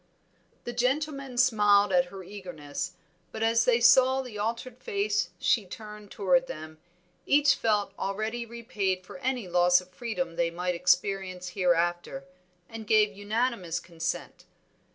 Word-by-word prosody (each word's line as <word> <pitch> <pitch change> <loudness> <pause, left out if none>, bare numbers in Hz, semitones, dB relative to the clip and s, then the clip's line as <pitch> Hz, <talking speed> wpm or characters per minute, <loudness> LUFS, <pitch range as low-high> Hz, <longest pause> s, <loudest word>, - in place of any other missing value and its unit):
The 240 - -5
gentlemen 275 +1 -1
smiled 205 -5 +4
at 175 -1 +4
her 190 +1 -10
eagerness, 175 -7 -6 0.4
but 220 - -4
as 230 0 +3
they 240 -1 +4
saw 260 +2 +5
the 250 -4 -10
altered 230 +4 -4
face 205 -4 -1
she 230 - +2
turned 210 +1 -10
toward 260 +8 +2
them, 155 0 -8 0.5
each 290 0 +5
felt 210 -3 0
already 215 +4 -2
repaid 210 -5 -3
for 275 - -11
any 255 -6 -2
loss 180 0 +4
of 180 0 -14
freedom 230 -1 -4
they 170 -1 +2
might 180 +2 -2
experience 185 +1 0
hereafter, 175 -1 0 0.4
and 225 -1 -9
gave 215 -1 +4
unanimous 205 -3 -1
consent. 165 -2 -5
205 Hz, 135 wpm, -28 LUFS, 180-235 Hz, 0.5 s, saw